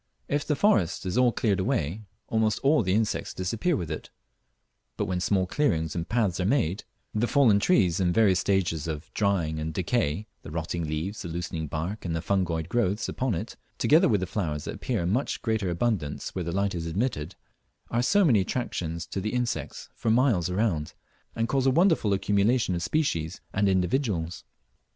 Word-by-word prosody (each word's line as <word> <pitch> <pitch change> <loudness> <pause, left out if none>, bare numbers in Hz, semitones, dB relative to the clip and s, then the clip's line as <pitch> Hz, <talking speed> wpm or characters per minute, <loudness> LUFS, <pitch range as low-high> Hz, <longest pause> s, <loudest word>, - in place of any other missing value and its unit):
If 145 +1 -1
the 150 - +2
forest 135 - +2
is 90 - -2
all 125 -1 +4
cleared 105 -4 0
away, 95 - -1 0.3
almost 110 -2 +1
all 145 +1 +4
the 95 -2 +1
insects 110 -1 -1
disappear 115 - 0
with 85 -4 -4
it; 80 - -5 0.9
but - - 0
when 90 0 -1
small 95 0 +1
clearings 85 - 0
and 85 0 -3
paths 105 -6 +1
are 90 - 0
made, 100 - 0 0.3
the 110 +3 +1
fallen 120 -8 +4
trees 100 - +3
in 90 -2 +2
various 95 -2 +4
stages 90 -7 0
of 75 -1 -6
drying 90 -7 0
and 80 +1 -3
decay, 95 -1 0 0.2
the - - -10
rotting 85 +1 -3
leaves, 80 +8 -3
the - - -5
loosening 85 -1 -4
bark 85 +8 -4
and 85 -2 -2
the 80 - -2
fungoid 85 -5 0
growths 110 0 0
upon 130 -6 -1
it, 105 +8 -5 0.2
together 155 +3 +4
with 105 -5 +2
the - - 0
flowers 80 -6 -3
that - - -5
appear - - -2
in 85 - 0
much 125 +6 0
greater 110 -5 0
abundance 85 -5 -1
where 90 - -2
the 85 - -2
light 100 +2 0
is 85 -2 -3
admitted, 90 - -2 0.6
are 120 - +2
so 200 +10 +4
many 120 -10 +5
attractions 85 -6 -3
to 95 - -4
the 110 +5 -2
insects 125 -1 -3
for 115 - -2
miles 110 - +3
around, 90 -6 -1 0.4
and 115 0 0
cause 135 +1 +1
a - - +6
wonderful 165 - +3
accumulation 100 +2 +2
of 85 - -2
species 85 - -1
and 100 -1 +2
individuals. 90 - 0
95 Hz, 190 wpm, -27 LUFS, 85-115 Hz, 0.9 s, a